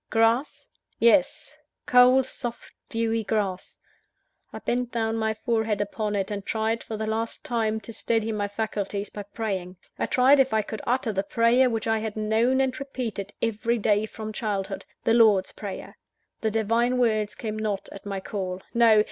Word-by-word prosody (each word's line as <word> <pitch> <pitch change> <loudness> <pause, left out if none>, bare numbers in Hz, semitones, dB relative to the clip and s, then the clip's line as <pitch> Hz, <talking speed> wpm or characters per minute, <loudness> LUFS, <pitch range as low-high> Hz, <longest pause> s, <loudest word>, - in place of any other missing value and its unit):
Grass? 225 +5 +1 0.3
yes! 285 +6 +3 0.3
cold, 250 +1 +6
soft, 240 -2 -6 0.2
dewy 225 0 0
grass. 200 -3 -2 0.7
I - - -7
bent 245 0 -2
down 225 -1 0
my 220 -1 0
forehead 220 -2 0
upon 210 +1 -2
it, 195 0 -1
and 200 -1 -3
tried, 225 +2 -1
for 220 - -5
the 220 - -2
last 225 +1 -3
time, 220 -2 0
to 225 +2 -10
steady 225 0 0
my 205 -2 -1
faculties 205 -1 -3
by 205 - -6
praying; 195 -3 -4 0.3
tried 265 +3 +5
if 265 -4 +3
I 215 - +2
could 215 +1 -6
utter 245 -2 +1
the 195 - +1
prayer 235 +5 +3
which 225 -2 -2
I 225 0 +1
had 220 0 -4
known 225 +5 +2
and 260 -1 -1
repeated 240 -7 -5
every 230 +1 0
day 210 0 +2
from 215 0 -7
childhood 200 -3 -3 0.2
the 225 - +3
Lord's 215 -5 +5
Prayer. 200 -3 -8 0.4
The 220 - +1
Divine 230 +3 +1
Words 215 -4 +1
came 215 -1 -4
not 210 -3 -2
at 195 - -10
my 200 -1 -4
call 190 -2 -4
no! 230 -2 +6
220 Hz, 170 wpm, -26 LUFS, 210-235 Hz, 0.7 s, cold